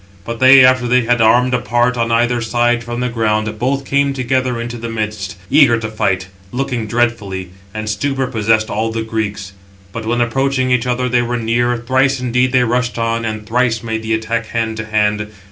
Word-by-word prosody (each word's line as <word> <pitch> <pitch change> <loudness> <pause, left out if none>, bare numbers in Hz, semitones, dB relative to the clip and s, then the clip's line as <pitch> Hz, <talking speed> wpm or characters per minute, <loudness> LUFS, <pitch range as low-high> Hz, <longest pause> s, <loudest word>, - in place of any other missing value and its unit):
But 115 0 -5
they, 130 0 +8
after 130 -1 +3
they 125 +1 +3
had 120 0 +1
armed 125 +3 +4
apart 120 +1 +1
on 115 -1 -1
either 120 +1 +1
side 120 +1 +1
from 120 +1 -5
the 125 - 0
ground, 110 -2 -1
both 135 +3 -1
came 140 +1 +1
together 130 -1 -1
into 120 +1 -5
the 115 0 -5
midst, 105 -3 -4 0.2
eager 135 -5 +5
to 110 -1 -4
fight, 95 -3 -1 0.3
looking 125 -3 -3
dreadfully; 105 -6 -2 0.2
and 110 +1 -5
stupor 135 +5 -1
possessed 110 -3 0
all 110 +2 -1
the 115 0 -3
Greeks. 105 -3 -4 0.4
But 110 +2 -6
when 120 +1 0
approaching 130 +2 0
each 125 0 +1
other, 125 +1 0
they 125 0 +2
were 120 0 -2
near, 120 +1 0
thrice 130 +3 +1
indeed 125 0 +1
they 125 -1 +3
rushed 125 +1 -1
on, 115 0 -1
and 110 -1 -4
thrice 120 0 0
made 110 -1 -3
the 110 0 -1
attack 110 0 -3
hand 110 -1 -2
to 110 - -4
hand. 105 -1 0
115 Hz, 195 wpm, -16 LUFS, 110-125 Hz, 0.4 s, they